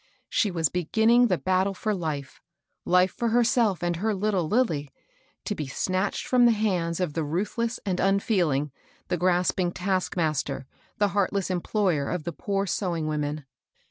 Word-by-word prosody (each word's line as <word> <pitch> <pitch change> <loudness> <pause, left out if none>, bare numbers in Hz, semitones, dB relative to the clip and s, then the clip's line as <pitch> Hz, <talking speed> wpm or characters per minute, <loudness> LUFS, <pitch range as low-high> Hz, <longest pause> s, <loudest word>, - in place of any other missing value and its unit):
She 210 - +2
was 165 -4 +1
beginnikig 220 - +3
the 185 -5 +1
battle 190 +2 +1
for 215 +3 -1
life, 155 -7 -4 0.2
— - - -53
life 180 +1 +5
for 235 - -2
herself 230 -5 +2
and 175 -1 0
her 215 +3 0
Uttle 190 -5 0
Lilly, 165 - +1 0.3
— - - -39
to - - -1
be 150 - -4
snatched 185 +8 -1
fix)m 250 -1 +4
the 235 - +6
hands 185 -6 0
of 180 -5 -1
the 165 - -1
mthless 210 +10 -2
and 185 -3 -1
unfeeling, 185 - +1 0.4
the 180 - 0
grasping 180 0 +1
taskmaster, 175 -7 -1 0.3
the 205 -1 +2
heartless 195 -1 0
employer 180 -5 0
of 180 -3 -3
the 170 - -4
poor 195 -1 -2
sewing 175 -4 -2
woqjen. 150 -1 -2
185 Hz, 165 wpm, -26 LUFS, 165-205 Hz, 0.4 s, the